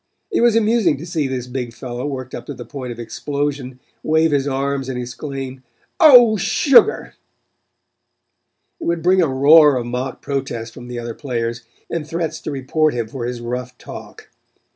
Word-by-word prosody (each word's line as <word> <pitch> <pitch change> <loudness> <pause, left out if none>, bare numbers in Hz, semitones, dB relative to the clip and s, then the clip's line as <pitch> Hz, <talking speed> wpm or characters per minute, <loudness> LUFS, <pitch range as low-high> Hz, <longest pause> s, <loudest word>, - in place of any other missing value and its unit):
It 360 - +1
was 235 -2 +4
amusing 215 -8 +2
to 155 - -8
see 165 -5 -1
this 130 -2 -3
big 125 -2 -5
fellow, 125 +1 -5
worked 130 -3 -6
up 120 - -7
to - - -6
the - - -9
point 130 -4 -7
of 120 - -8
explosion, 140 +1 -4 0.2
wave 160 0 +2
his 140 -1 +1
arms 135 0 -2
and 130 - -3
exclaim: 130 +1 -6 0.4
"Oh, 245 -9 +8
sugar!" 255 - +3 1.7
It - - -6
would 170 -1 -1
bring 185 +1 +4
a 165 - +3
roar 145 +2 +6
of 120 -2 -2
mock 125 +2 -4
protest 120 -5 -4
from 120 - -11
the 125 0 -6
other 120 -1 -5
players, 120 -3 -4 0.2
and 160 -3 -4
threats 165 -1 -3
to - - -5
report 145 +2 0
him 115 -2 -3
for 120 -1 -5
his 120 -1 -5
rough 125 +1 -5
talk. - - -11
135 Hz, 175 wpm, -19 LUFS, 125-160 Hz, 1.7 s, Oh